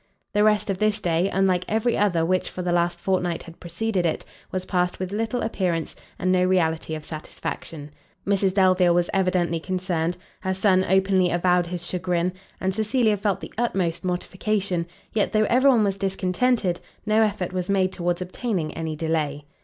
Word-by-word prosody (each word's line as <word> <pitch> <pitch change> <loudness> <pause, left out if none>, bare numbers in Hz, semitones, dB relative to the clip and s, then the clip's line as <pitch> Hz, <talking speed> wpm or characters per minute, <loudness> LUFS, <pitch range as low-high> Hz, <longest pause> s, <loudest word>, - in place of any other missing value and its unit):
The 210 0 +3
rest 210 -1 +3
of 190 - -4
this 215 0 +2
day, 175 0 +1
unlike 190 -2 +2
every 225 +2 +1
other 175 -6 +2
which 185 +2 0
for 180 - -5
the 175 - 0
last 175 0 +1
fortnight 180 -3 -1
had 165 0 -13
preceded 185 +3 -2
it, 165 -2 -1 0.3
was 185 0 -3
passed 180 -1 0
with 185 0 -4
little 225 +3 -1
appearance, 180 -7 -1 0.2
and 185 0 0
no 180 -1 +3
reality 160 -3 +1
of 155 - -7
satisfaction: 155 -1 -6 0.3
Mrs 195 -1 +2
Delvile 185 -2 +4
was 175 0 +1
evidently 180 -3 +1
concerned, 180 -1 -2 0.2
her 190 -1 -2
son 190 -1 +3
openly 190 -1 +3
avowed 175 0 +2
his 175 0 -4
chagrin, 180 0 -1 0.3
and 190 0 0
Cecilia 220 +1 +2
felt 200 -1 -1
the - - -8
utmost 190 -8 0
mortification; 185 0 -1 0.3
yet, 215 - +1
though 215 0 +4
every 260 +3 +5
one 235 -5 +5
was 200 -1 0
discontented, 195 +1 0 0.3
no 215 +1 +3
effort 195 -4 0
was 185 0 -3
made 190 -1 +2
towards 175 0 -1
obtaining 180 -4 -3
any 160 -1 -4
delay. 150 -2 -1
185 Hz, 175 wpm, -24 LUFS, 175-200 Hz, 0.3 s, every